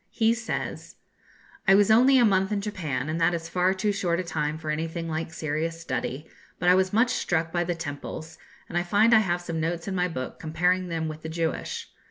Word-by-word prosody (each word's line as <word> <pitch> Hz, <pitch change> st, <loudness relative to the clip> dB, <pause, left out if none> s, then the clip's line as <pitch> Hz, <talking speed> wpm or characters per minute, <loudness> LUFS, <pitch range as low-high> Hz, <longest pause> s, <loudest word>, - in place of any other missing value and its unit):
He 225 Hz, -1 st, +2 dB
says: 235 Hz, 0 st, -4 dB, 0.7 s
'I 195 Hz, -, +7 dB
was 205 Hz, +1 st, +5 dB
only 255 Hz, +4 st, +6 dB
a 245 Hz, -, +6 dB
month 195 Hz, -1 st, +2 dB
in 210 Hz, -, +1 dB
Japan, 160 Hz, -10 st, -3 dB
and 160 Hz, +2 st, -2 dB
that 170 Hz, +1 st, +3 dB
is 165 Hz, -1 st, -5 dB
far 180 Hz, +2 st, +2 dB
too 205 Hz, +2 st, 0 dB
short 175 Hz, -4 st, 0 dB
a -, -, -1 dB
time 155 Hz, -2 st, -2 dB
for 155 Hz, -1 st, -4 dB
anything 165 Hz, +2 st, -3 dB
like 160 Hz, 0 st, -3 dB
serious 165 Hz, +1 st, -3 dB
study; 150 Hz, -3 st, -4 dB, 0.3 s
but 175 Hz, -, -2 dB
I -, -, +8 dB
was 185 Hz, 0 st, +2 dB
much 230 Hz, +4 st, +3 dB
struck 165 Hz, -2 st, 0 dB
by 175 Hz, 0 st, +1 dB
the 175 Hz, 0 st, -2 dB
temples, 160 Hz, 0 st, -7 dB, 0.3 s
and 175 Hz, -, -1 dB
I -, -, +1 dB
find 205 Hz, +6 st, +3 dB
I 220 Hz, -, +8 dB
have 175 Hz, -4 st, 0 dB
some 165 Hz, -2 st, -4 dB
notes 165 Hz, +2 st, -2 dB
in 195 Hz, -, -2 dB
my 180 Hz, -1 st, +1 dB
book 130 Hz, -7 st, -6 dB
comparing 180 Hz, +3 st, +1 dB
them 165 Hz, -2 st, -2 dB
with 155 Hz, 0 st, -6 dB
the 160 Hz, -, -6 dB
Jewish. 165 Hz, 0 st, -3 dB
170 Hz, 225 wpm, -26 LUFS, 160-190 Hz, 0.7 s, I